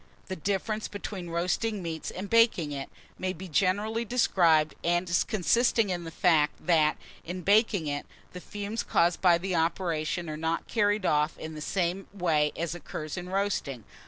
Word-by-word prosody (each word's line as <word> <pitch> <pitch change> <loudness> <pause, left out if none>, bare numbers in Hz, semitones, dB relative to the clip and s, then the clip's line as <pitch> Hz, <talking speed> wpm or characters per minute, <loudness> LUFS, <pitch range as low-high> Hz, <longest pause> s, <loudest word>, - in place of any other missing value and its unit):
THE 190 - -2
DIFFERENCE 205 +4 -2
BETWEEN 200 -3 -6
ROASTING 180 +5 -1
MEAT 160 -1 -4
AND 190 +2 -5
BAKING 230 -9 +3
IT, 140 -1 -5 0.3
may 185 0 -1
be 185 +2 -9
generally 205 +7 +1
described 170 -10 +3
as 175 +1 +2
consisting 225 +1 +2
in 175 -1 -3
the - - -5
fact, 160 -4 +2
that, 155 -3 +3 0.3
in 180 +2 -5
baking 200 -2 +3
it, 145 -1 -3 0.3
the 180 - -8
fumes 205 +4 -4
caused 170 +1 +1
by 175 -2 +5
the 185 +1 -3
operation 165 0 -1
are 155 - -4
not 160 +1 -2
carried 205 -2 +1
off 150 0 +1
in 160 0 -7
the 155 - -7
same 185 +3 -1
way 160 -6 +1
as 170 0 -2
occurs 155 -2 -6
in 180 0 -6
roasting. 190 - -2
175 Hz, 165 wpm, -28 LUFS, 160-200 Hz, 0.3 s, by